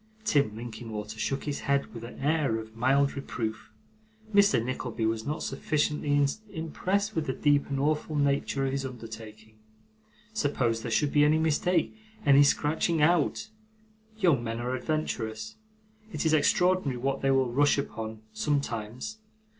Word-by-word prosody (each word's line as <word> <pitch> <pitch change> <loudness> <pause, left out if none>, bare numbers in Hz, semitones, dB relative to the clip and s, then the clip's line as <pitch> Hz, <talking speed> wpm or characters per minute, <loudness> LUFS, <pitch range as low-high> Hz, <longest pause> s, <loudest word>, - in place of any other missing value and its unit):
Tim 140 - +2
Linkinwater 110 -2 -7
shook 115 +5 -1
his 145 -2 -3
head 140 -5 0
with 115 -1 -8
an 120 - -9
air 145 -4 +1
of 110 0 -8
mild 135 +4 +2
reproof. 110 -5 -4 0.6
Mr. 200 - +5
Nickleby 125 -2 -3
was 110 +1 -1
not 150 +2 -2
sufficiently 150 -2 +1 0.2
impressed 195 +5 -2
with 160 - -1
the 130 - 0
deep 145 0 +2
and 135 -1 -1
awful 150 +2 0
nature 140 -1 +1
of 135 - 0
his 135 0 -2
undertaking. 110 -3 -9 0.7
Suppose 130 - 0
there - - -4
should 115 +6 +1
be 145 - +5
any 150 +1 +4
mistake 160 +4 +1 0.3
any 140 -1 +7
scratching 155 +3 +2
out! 165 +6 +2 0.7
Young 170 - +3
men 115 0 -3
are 125 +1 -2
adventurous. 115 -6 -3 0.5
It - - -3
is 160 - +3
extraordinary 180 -2 +3
what 135 +2 -1
they 135 - +1
will 135 -2 +2
rush 145 +3 +4
upon, 110 -5 -5
sometimes. 140 - -2
140 Hz, 145 wpm, -28 LUFS, 115-150 Hz, 0.7 s, any